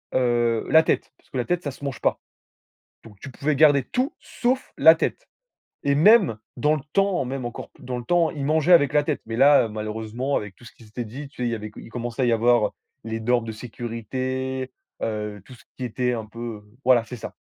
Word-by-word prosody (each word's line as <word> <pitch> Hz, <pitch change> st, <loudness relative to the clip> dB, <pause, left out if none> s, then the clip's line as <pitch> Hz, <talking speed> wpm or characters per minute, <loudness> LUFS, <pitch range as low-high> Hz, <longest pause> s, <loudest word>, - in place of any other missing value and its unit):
heu, 120 Hz, -2 st, +1 dB
la 160 Hz, 0 st, +7 dB
tête, -, -, 0 dB
parce -, -, -30 dB
que 130 Hz, -, -4 dB
la 120 Hz, -, 0 dB
tête 175 Hz, 0 st, -1 dB
ça 145 Hz, -, -3 dB
se 140 Hz, -, -15 dB
mange 140 Hz, -4 st, -4 dB
pas, -, -, +1 dB, 0.8 s
donc 105 Hz, -4 st, -15 dB
tu 140 Hz, -, -8 dB
pouvais 145 Hz, +3 st, -1 dB
garder 145 Hz, -2 st, +5 dB
tout 255 Hz, -, -2 dB
sauf 255 Hz, +2 st, -2 dB
la 160 Hz, +3 st, +8 dB
tête, -, -, -3 dB, 0.6 s
et 140 Hz, -, +2 dB
même 180 Hz, -, +5 dB, 0.2 s
dans 150 Hz, +1 st, +2 dB
le 150 Hz, -, -4 dB
temps, 195 Hz, -6 st, +2 dB
même 130 Hz, -1 st, -4 dB
encore 120 Hz, -, -6 dB
p -, -, -23 dB
dans 125 Hz, 0 st, -4 dB
le -, -, -8 dB
temps, 170 Hz, +2 st, +2 dB
ils 140 Hz, -2 st, -4 dB
mangeaient 160 Hz, +3 st, +3 dB
avec 145 Hz, -3 st, +5 dB
la 150 Hz, -1 st, +4 dB
tête, 150 Hz, -1 st, -2 dB
mais 115 Hz, -, -4 dB
là 140 Hz, -4 st, +6 dB
malheureusement 110 Hz, +5 st, -3 dB
avec 105 Hz, -3 st, -3 dB
tout 120 Hz, -, -17 dB
ce -, -, -12 dB
qui -, -, -18 dB
s'était 115 Hz, +3 st, -6 dB
dit, 135 Hz, +6 st, -8 dB
tu 125 Hz, -3 st, -6 dB
sais 120 Hz, -, +1 dB
il -, -, -2 dB
avait 110 Hz, 0 st, -6 dB
il -, -, -10 dB
commençait 120 Hz, +2 st, -3 dB
à -, -, +3 dB
y 120 Hz, -, +2 dB
avoir 115 Hz, 0 st, +3 dB, 0.3 s
les 115 Hz, 0 st, -4 dB
normes 120 Hz, 0 st, +1 dB
de 110 Hz, -, -4 dB
sécurité, 130 Hz, +3 st, -4 dB, 0.3 s
heu, 105 Hz, -2 st, -3 dB
tout 130 Hz, -, -13 dB
ce 120 Hz, -, -16 dB
qui 130 Hz, -, -5 dB
était 125 Hz, +1 st, -1 dB
un 110 Hz, -2 st, -4 dB
peu 115 Hz, -1 st, -7 dB, 0.2 s
voilà 125 Hz, -3 st, +5 dB
c'est 125 Hz, -, -7 dB
ça -, -, -8 dB
125 Hz, 230 wpm, -24 LUFS, 115-145 Hz, 0.8 s, la